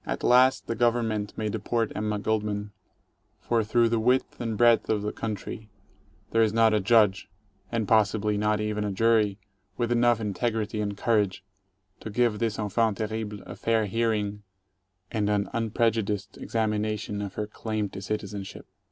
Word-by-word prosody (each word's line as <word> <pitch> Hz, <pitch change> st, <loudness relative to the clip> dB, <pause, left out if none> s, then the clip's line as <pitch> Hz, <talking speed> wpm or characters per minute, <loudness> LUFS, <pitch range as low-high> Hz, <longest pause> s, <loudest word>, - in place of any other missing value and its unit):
At -, -, -4 dB
last 130 Hz, +2 st, +5 dB
the -, -, -2 dB
Government 115 Hz, -3 st, 0 dB
may 110 Hz, -, -1 dB
deport 110 Hz, +2 st, -1 dB
Emma 105 Hz, 0 st, -1 dB
Goldman, 105 Hz, -1 st, -2 dB, 0.7 s
for 115 Hz, -2 st, 0 dB
through 115 Hz, +2 st, +3 dB
the 115 Hz, 0 st, +1 dB
width 125 Hz, +3 st, +1 dB
and 115 Hz, -3 st, -2 dB
breadth 120 Hz, 0 st, +4 dB
of 105 Hz, -2 st, +1 dB
the 105 Hz, -, -2 dB
country 110 Hz, 0 st, -6 dB, 0.6 s
there 115 Hz, -, +3 dB
is 110 Hz, -2 st, +3 dB
not 115 Hz, 0 st, +4 dB
a 105 Hz, -, +3 dB
Judge 105 Hz, -2 st, +3 dB, 0.2 s
— 95 Hz, -1 st, -37 dB
and 115 Hz, -3 st, -1 dB
possibly 105 Hz, -1 st, +2 dB
not 105 Hz, +1 st, +1 dB
even 105 Hz, 0 st, -1 dB
a 105 Hz, -, -2 dB
jury 105 Hz, -1 st, +2 dB, 0.2 s
— 95 Hz, 0 st, -44 dB
with 120 Hz, -1 st, -1 dB
enough 120 Hz, -1 st, +3 dB
integrity 110 Hz, 0 st, -2 dB
and 100 Hz, -1 st, -3 dB
courage 105 Hz, -5 st, +1 dB, 0.6 s
to -, -, -7 dB
give 110 Hz, -1 st, +1 dB
this 115 Hz, -2 st, -1 dB
enfant 110 Hz, 0 st, 0 dB
terrible 110 Hz, -1 st, -4 dB
a -, -, -9 dB
fair 115 Hz, -1 st, +1 dB
hearing 105 Hz, -1 st, -1 dB, 0.7 s
and 105 Hz, -2 st, 0 dB
an 100 Hz, -1 st, +1 dB
unprejudiced 110 Hz, -2 st, 0 dB
examination 105 Hz, -2 st, -2 dB
of 100 Hz, -2 st, -6 dB
her 105 Hz, -, -2 dB
claim 105 Hz, 0 st, -3 dB
to 95 Hz, -, -8 dB
citizenship. 100 Hz, -1 st, -5 dB
110 Hz, 165 wpm, -27 LUFS, 105-115 Hz, 0.7 s, last